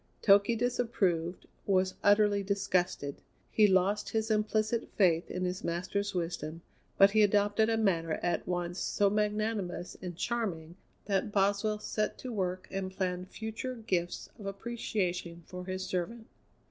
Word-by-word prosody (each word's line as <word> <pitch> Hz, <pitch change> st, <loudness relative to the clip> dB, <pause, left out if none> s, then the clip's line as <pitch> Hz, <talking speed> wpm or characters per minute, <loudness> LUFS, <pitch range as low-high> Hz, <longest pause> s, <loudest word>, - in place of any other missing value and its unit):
Toky 200 Hz, +3 st, +6 dB
disapproved, 200 Hz, -8 st, 0 dB, 0.2 s
was 185 Hz, -1 st, +2 dB
utterly 205 Hz, 0 st, +4 dB
disgusted; 185 Hz, -7 st, -1 dB, 0.3 s
he 215 Hz, -1 st, +5 dB
lost 195 Hz, +2 st, +2 dB
his 220 Hz, 0 st, -1 dB
implicit 215 Hz, +2 st, +1 dB
faith 175 Hz, -4 st, +3 dB
in 185 Hz, 0 st, -2 dB
his 180 Hz, +1 st, -3 dB
master's 185 Hz, +4 st, -2 dB
wisdom, 165 Hz, -1 st, -3 dB, 0.3 s
but 195 Hz, 0 st, +7 dB
he 215 Hz, +1 st, +4 dB
adopted 205 Hz, +1 st, +3 dB
a 225 Hz, -, +2 dB
manner 170 Hz, -7 st, +1 dB
at 175 Hz, -, 0 dB
once 175 Hz, 0 st, -2 dB
so 200 Hz, -1 st, +2 dB
magnanimous 210 Hz, -3 st, -1 dB
and 175 Hz, -2 st, -6 dB
charming 180 Hz, -8 st, -2 dB, 0.3 s
that 200 Hz, 0 st, 0 dB
Boswell 205 Hz, +2 st, +2 dB
set 215 Hz, 0 st, -2 dB
to 255 Hz, -2 st, -6 dB
work 185 Hz, -3 st, -2 dB
and 190 Hz, -1 st, -2 dB
planned 185 Hz, -1 st, -3 dB
future 220 Hz, +4 st, -5 dB
gifts 185 Hz, -6 st, -2 dB
of 200 Hz, -, -6 dB
appreciation 195 Hz, -5 st, -3 dB
for 180 Hz, 0 st, -8 dB
his 185 Hz, 0 st, -3 dB
servant. 220 Hz, +6 st, -3 dB
195 Hz, 140 wpm, -31 LUFS, 180-215 Hz, 0.3 s, but